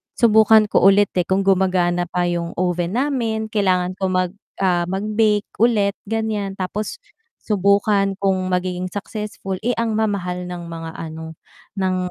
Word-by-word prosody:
subukan 220 -2 +5
ko - - +3
ulit, 200 0 +5
eh, 175 - +1
kung 195 +1 +1
gumagana 180 -2 +2
pa 180 +1 -1
'yung 170 -1 -3
oven 180 +2 -1
namin, 235 -5 -1
kailangan 185 -3 +1
ko 190 - 0
mag, 185 -1 0 0.3
ah, 175 -2 +2
mag-bake 210 +2 0
ulit 215 -4 +3
ganiyan, 215 -3 -2
tapos 200 - -4 0.4
subukan 200 0 +2
kung 195 -1 +2 0.2
magiging 180 0 -1
successful. 205 0 -5
Eh, 245 - +2
ang 225 -2 -1
mamahal 180 -5 -1
ng 180 -1 -6
mga 165 -1 -6
ano 160 0 -7 0.4
ng 185 -1 0
195 Hz, 145 wpm, -20 LUFS, 180-215 Hz, 0.4 s, subukan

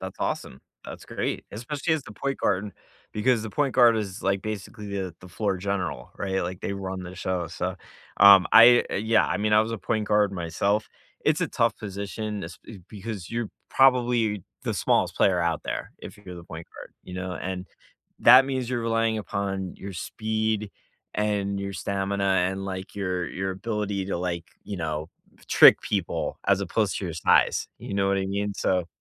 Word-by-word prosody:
That's - - -7
awesome. 65 - -3 0.2
That's - - -9
great. - - -3
Especially 145 +9 -2
as 155 - -3
the 130 - -12
point 135 +6 -3
guard, 100 0 +1
and 105 - -7 0.4
because 115 +1 +1
the 110 - -5
point 140 +3 0
guard 120 -3 +6
is, 100 -2 -4
like, 95 0 0
basically 105 0 -6
the 95 -3 -4
the 90 - -12
floor 100 +1 -1
general, 90 -9 -3
right? 95 -1 -1
Like, 90 +1 -5
they - - -3
run 95 -1 -5
the 90 +1 -8
show, 95 -1 -2
so, 90 +3 -4 0.4
um, 100 -2 +8
I 120 +1 +9
yeah, 110 +2 +2
I - - -1
mean, 105 +1 0
I 105 - +7
was 110 +1 -1
a 115 - -3
point 105 +3 -2
guard 105 -1 +3
myself. 100 +4 -1 0.4
It's - - +2
a - - +1
tough - - +1
position 100 +1 -5
esp - - -8
eh, 105 - -9
because 105 -3 -7
you're 115 -2 -2 0.2
probably 120 -6 +3 0.2
the - - -1
smallest - - +1
player 95 -2 +3
out 85 -2 0
there, - - -5
if - - -10
you're 95 -3 -10
the 85 - -10
point 80 0 -9
guard, - - -10
you 90 - -9
know, 95 0 -4
and 95 0 -4 0.5
that 125 +3 +8
means 130 -3 -2
you're 125 -1 -1
relying 115 -1 +1
upon 95 -3 -3
your 100 0 -7
speed, 110 +2 -2 0.4
and 100 -2 -1
your 100 0 -4
stamina 100 0 -2
and, 95 0 +1
like, 95 0 -6
your 90 -3 -2
your 95 0 -3
ability 100 -1 -3
to, 100 - -2
like, 85 -1 -3 0.2
you 100 - -5
know, 80 -2 -3 0.4
trick - - +8
people 95 -4 -2
as 100 -1 +4
opposed 100 +2 0
to - - -5
your 85 -3 -4
size, 80 - +3
you - - -6
know 100 0 +2
what 100 0 +2
I 95 - -1
mean? 100 +1 -2
So 90 -3 0
100 Hz, 190 wpm, -26 LUFS, 95-110 Hz, 0.5 s, I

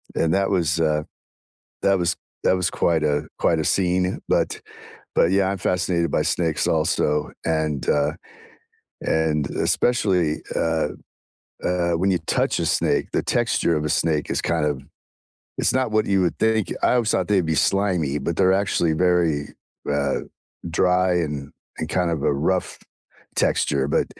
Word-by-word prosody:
and 80 +1 +1
that 95 0 +1
was, 85 -4 +1
uh 75 -1 +1 0.8
that 100 -1 +4
was 90 0 +1 0.3
that - - +3
was 90 -1 0
quite 80 -2 +1
a 75 -1 0
quite 80 -2 +2
a 80 - -1
scene, 90 +1 +1
but - - +1 0.6
but, 85 - +3
yeah, 95 0 +2
I'm 100 - -2
fascinated 90 -1 0
by - - +1
snakes 80 -3 0
also, 75 -1 +1
and, 80 -3 -1
uh 75 0 +2 0.9
and 75 -3 0
especially, 90 -10 +1 0.2
uh 80 -1 0 0.7
uh, 90 -1 0
when 95 +4 +1
you 90 - +2
touch - - +1
a - - 0
snake, - - 0
the - - 0
texture 85 - +1
of 75 0 -1
a - - -1
snake 75 -1 0
is - - 0
kind 80 -3 0
of 75 -3 -1 0.8
it's - - +2
not 130 -3 +1
what 110 0 +2
you 95 -2 +2
would 85 - -1
think, 110 -2 +1
I - - +3
always 120 -3 +1
thought 95 0 0
they'd 95 -4 +2
be 80 - 0
slimy, 90 -8 +1
but 80 +4 -3
they're 95 -1 +4
actually 95 -4 +1
very, 85 -4 +1 0.4
uh, 70 -1 0 0.5
dry 90 +1 +2
and 75 -5 -3 0.3
and 80 - -3
kind 90 +1 0
of 80 -4 -2
a - - +2
rough 90 +6 -1 0.6
texture, 70 -1 +1
but - - +1
85 Hz, 165 wpm, -22 LUFS, 75-95 Hz, 0.9 s, that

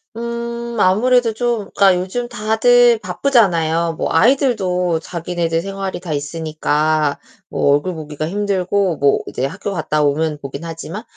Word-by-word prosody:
음, 235 0 -5
아무래도 230 +5 +3
좀 235 -2 -1
그니까 195 -2 +5
요즘 190 +7 -3
다들 240 +1 +3
바쁘잖아요. 170 - +1
뭐 - - -2
아이들도 185 - +2
자기네들 170 -1 -2
생활이 195 0 -5
다 175 -4 -5
있으니까 155 -1 -1 0.3
뭐 140 - +2
얼굴 145 +6 0
보기가 155 -1 -5
힘들고 195 -2 0
뭐 140 0 +3
이제 130 - -3
학교 140 +8 -5
갔다 155 -3 0
오면 150 +1 0
보긴 140 +3 -7
하지만. 165 +5 -7
180 Hz, 310 characters per minute, -18 LUFS, 160-225 Hz, 0.3 s, 그니까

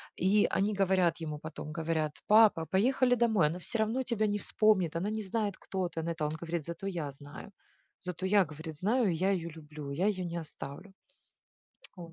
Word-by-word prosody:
И 200 +3 +3
они 200 +2 +1
говорят 190 -4 +2
ему, 155 -3 -5
потом 155 0 -7
говорят: 160 -2 -1
"Папа, 210 -6 +6
поехали 245 - +3
домой. 220 -9 +3
Она 165 +4 -3
все 205 - -3
равно 220 +4 +1
тебя 230 -4 0
не 205 0 0
вспомнит. 195 -7 +2
Она 180 +5 -1
не 220 0 -2
знает, 205 0 -1
кто 185 -2 -3
ты". 165 - -6
Он 165 - -3
это, 165 -2 -2
он 150 - -2
говорит: 170 -2 -3
"Зато 170 +4 -5
я 165 -7 -3
знаю. 145 +7 -11 0.5
Зато 180 0 -5
я",- 195 0 +4
говорит,- 155 0 -8
"знаю, 220 - +2
и - - 0
я 185 +4 +1
ее 170 -3 -1
люблю. 150 -2 -9
Я 175 +8 +1
ее 190 -3 0
не 170 0 -4
оставлю". 170 +3 -8 1.0
О. 170 -2 -9
180 Hz, 200 wpm, -31 LUFS, 160-205 Hz, 1.0 s, Папа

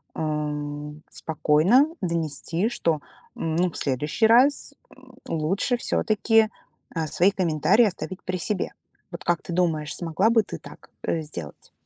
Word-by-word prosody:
м, 150 -1 -3
спокойно 160 - +3 0.2
донести, 170 +2 -1
что, 165 -10 0 0.4
м, 160 -1 -2
ну, 180 0 +2
в - - -8
следующий 150 - 0
раз 265 +5 +4 0.5
лучше 175 - 0
всё-таки, 225 -1 +2 0.5
э, 165 -1 0
свои 175 +5 +3
комментарии 185 +4 +3
оставить 190 -1 -4
при 185 0 -2
себе. 190 +2 -2 0.4
Вот 170 - -7
как 175 0 0
ты 175 - -5
думаешь, 165 -4 0
смогла 175 +5 +1
бы 230 -1 +5
ты - - -7
так, - - -14
э, 165 - 0
сделать? 85 - -9
170 Hz, 135 wpm, -25 LUFS, 150-200 Hz, 0.5 s, бы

